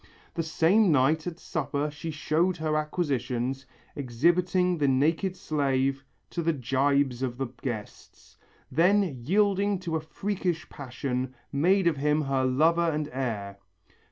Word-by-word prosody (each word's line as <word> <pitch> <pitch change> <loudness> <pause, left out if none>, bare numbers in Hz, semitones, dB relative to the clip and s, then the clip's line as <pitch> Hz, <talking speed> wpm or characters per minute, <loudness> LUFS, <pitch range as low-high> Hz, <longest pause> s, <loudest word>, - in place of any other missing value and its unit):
The 165 - -1
same 170 +5 +3
night 155 +4 +2
at 170 -2 -4
supper 150 -3 -2
she 150 +3 -6
showed 165 +4 0
her 155 -1 -1
acquisitions, 135 -5 -2 0.3
exhibiting 175 +7 +1
the 145 - +2
naked 160 +8 +1
slave 135 -4 0 0.3
to 170 - -2
the 165 0 +1
gibes 135 -1 +1
of 125 -2 -2
the 135 - -1 0.2
guests. 115 -6 -7 0.4
Then 180 +9 +4 0.2
yielding 200 - +2
to 170 -3 -3
a 160 - -1
freakish 180 0 -3
passion, 130 -1 -4 0.2
made 180 +7 +3
of 165 -4 +2
him 150 +2 +2
her 135 -1 0
lover 165 +6 +3
and 150 -1 -2
heir. 105 -7 -4
150 Hz, 135 wpm, -27 LUFS, 135-170 Hz, 0.4 s, Then